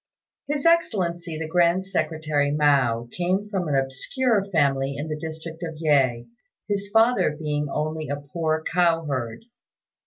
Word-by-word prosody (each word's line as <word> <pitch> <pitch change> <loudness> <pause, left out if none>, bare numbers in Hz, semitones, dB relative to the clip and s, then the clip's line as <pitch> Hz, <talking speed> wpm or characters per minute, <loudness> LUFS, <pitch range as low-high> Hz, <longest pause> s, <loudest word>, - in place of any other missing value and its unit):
His 290 0 -2
Excellency 175 - +1
the 160 0 -4
Grand 175 +2 +2
Secretary 155 -5 0
Mao 135 -6 +2
came 185 +4 -1
from 185 -4 -1
an 145 - 0
obscure 195 - 0
family 140 -4 +1
in 150 +2 -4
the 155 - -2
district 160 +1 -7
of 165 -2 -5
Yeh, 135 -7 +2 0.4
his 200 -1 -2
father 225 -7 +3
being 150 -2 -2
only 155 +1 -3
a 145 - 0
poor 155 +2 -2
cow 165 -2 +2
herd. 130 - -4
160 Hz, 145 wpm, -24 LUFS, 145-180 Hz, 0.4 s, father